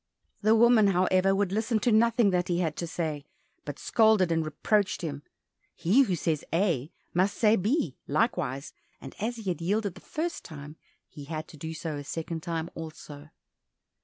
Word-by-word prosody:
The 215 +1 +4
woman, 230 -2 +6
however, 185 +1 +3
would 200 -2 0
listen 220 +3 0
to 240 - +2
nothing 225 -1 +4
that 180 -1 0
he 175 - 0
had 165 -4 -1
to 170 - -3
say, 160 -3 -3 0.4
but 145 -1 -6
scolded 220 -6 +3
and 165 -1 +1
reproached 185 +7 0
him. 145 -3 -4 0.5
He 205 +11 +4
who 195 -9 +2
says 160 -2 -1
A 165 -5 0 0.2
must 190 +3 +1
say 215 -1 +4
B, 205 - 0
likewise, 140 - -1 0.3
and 135 - -10
as 230 +4 -2
he 225 - -9
had 175 - -5
yielded 200 +2 0
the 185 - -14
first 335 +2 -4
time, 150 -1 -10 0.3
he 145 - -11
had 155 +1 -5
to 165 - -12
do 160 +2 -6
so 160 -3 -4
a 145 - -6
second 160 +2 -5
time 165 -1 -3
also. 155 -2 -9
175 Hz, 180 wpm, -28 LUFS, 155-215 Hz, 0.5 s, woman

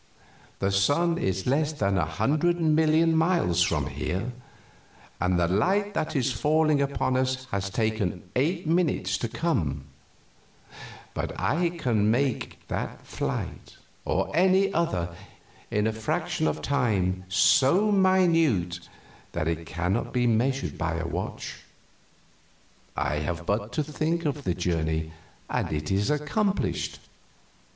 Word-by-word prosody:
The 100 0 0
sun 165 - +2
is 95 - -1
less 150 +4 +1
than 100 -9 0
a 90 -4 +2
hundred 155 - +1
million 160 0 +3
miles 160 - +2
from 80 -4 +2
here, 95 - -3 0.9
and 90 -1 +1
the 85 - +3
light 195 - +1
that 155 - -2
is 130 -1 +1
falling 155 +3 +2
upon 140 -2 0
us 130 0 0
has 100 0 -1
taken 110 -4 -1
eight 165 +8 0
minutes 165 0 +1
to 120 - -1
come; 80 - -1 1.3
but - - -4
I 170 +6 +1
can 120 -11 +1
make 130 +2 -1
that - - -4
flight, - - -4 0.3
or - - -1
any 190 +3 +4
other, 90 - -1 0.5
in 105 0 +1
a 110 - +1
fraction 110 -7 -1
of 75 0 -2
time 100 -9 0
so 140 - +4
minute 165 - +3 0.5
that 80 - -1
it 85 0 -2
cannot 90 +7 -2
be 125 -1 +2
measured 125 +4 0
by 85 -2 -1
a 85 0 -3
watch. - - -5 1.4
I 75 - 0
have 85 +2 -3
but 105 +3 -1
to 155 - 0
think 155 +3 -1
the 145 - -1
journey, 80 -2 -1 0.3
and - - -2
it 75 +1 -2
is 100 +1 +1
accomplished." 150 +8 -1
125 Hz, 130 wpm, -26 LUFS, -, 1.4 s, any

